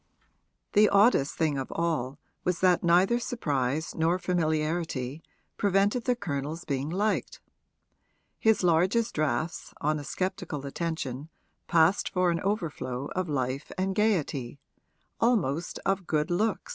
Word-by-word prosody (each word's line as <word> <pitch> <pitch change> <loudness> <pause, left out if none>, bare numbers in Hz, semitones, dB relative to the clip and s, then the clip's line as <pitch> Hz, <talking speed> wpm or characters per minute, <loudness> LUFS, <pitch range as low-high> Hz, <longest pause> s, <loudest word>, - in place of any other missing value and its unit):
The 210 +1 +6
oddest 200 - +4
thing 150 -4 0
of 130 - -5
all 150 -6 -1 0.3
was 180 -1 0
that 180 -2 +4
neither 180 +7 +4
surprise 150 - -1
nor 165 +2 +1
familiarity 160 -5 -1 0.4
prevented 200 +4 +2
the 250 - +2
Colonel's 155 - -4
being 140 0 -2
liked; 205 +5 -1 1.0
his 220 -3 +3
largest 185 +7 +2
drafts 155 +1 -2
on 155 +1 0
a - - -7
sceptical 180 -3 -3
attention 150 -2 -4 0.4
passed 170 +3 +3
for 180 -1 +2
an 170 - -1
overflow 145 - -3
of 185 -2 -1
life 130 -1 -2
and 190 +1 0
gaiety 155 - 0 0.6
almost 175 - +1
of 195 -2 0
good 155 +1 0
looks. 215 - 0
170 Hz, 125 wpm, -28 LUFS, 145-190 Hz, 1.0 s, The